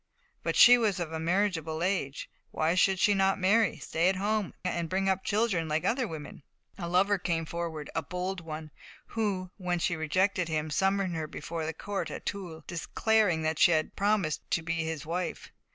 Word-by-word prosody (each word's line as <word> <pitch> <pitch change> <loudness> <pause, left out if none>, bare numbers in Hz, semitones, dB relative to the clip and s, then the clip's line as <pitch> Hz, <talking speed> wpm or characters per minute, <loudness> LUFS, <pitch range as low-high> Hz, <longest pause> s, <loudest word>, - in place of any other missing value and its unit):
But - - -1
she 245 0 +9
was 210 -5 +1
of 165 -2 -3
a 160 - -3
marriageable 165 -2 0
age; 175 -8 -1 0.2
why 160 +2 +1
should 190 +1 +3
she 205 +3 +4
not 195 -1 +2
marry, 205 +4 +3
stay 170 +3 +1
at 190 - +1
home, 205 0 -1
and 170 -2 -1
bring 195 +2 0
up 190 0 +1
children, 205 -6 +1
like 155 +2 -1
other 245 +4 +1
women? 155 -5 -8 0.4
A 170 -2 -4
lover 195 +3 +3
came 165 -2 -1
forward, 160 -2 -4
a 165 - 0
bold 180 +3 -4
one, 155 -1 -7 0.4
who, 195 -5 -2
when 180 -2 -1
she 170 0 0
rejected 185 +4 +1
him, 155 -1 -2
summoned 190 +1 +1
her 160 -1 -3
before 160 +1 -5
the 160 - -2
court 200 +3 -4
at - - -7
Toul, 175 -6 -5
declaring 185 0 +1
that 155 -1 -1
she 175 - +6
had 155 -1 0
promised 200 -6 +1
to 165 - 0
be 165 0 -1
his 160 -2 -4
wife. 175 +2 -4
180 Hz, 190 wpm, -29 LUFS, 160-195 Hz, 0.4 s, she